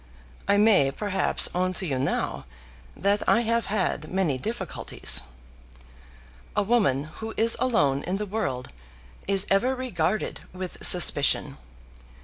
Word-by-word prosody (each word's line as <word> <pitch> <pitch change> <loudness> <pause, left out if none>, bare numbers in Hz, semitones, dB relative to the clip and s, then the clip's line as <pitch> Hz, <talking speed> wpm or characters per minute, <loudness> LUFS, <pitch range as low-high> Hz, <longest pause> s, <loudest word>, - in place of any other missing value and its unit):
I 200 - +3
may, 205 -10 +4
perhaps, 195 +6 0
own 185 +1 0
to 185 - -3
you 135 -6 -2
now 135 - -2 0.5
that 200 +1 +1
I 230 - +4
have 230 -1 -1
had 185 -6 -2
many 175 -8 -1
difficulties. 225 - 0 1.3
A - - +2
woman 195 - +1 0.2
who 220 0 -6
is 225 +1 +3
alone 145 - +1
in 185 +2 -2
the 210 - -3
world 185 -12 -4 0.6
is 195 0 +1
ever 245 +7 +2
regarded 215 -6 -2
with 185 -1 -8
suspicion. 155 -5 +4
195 Hz, 130 wpm, -25 LUFS, 165-220 Hz, 1.3 s, may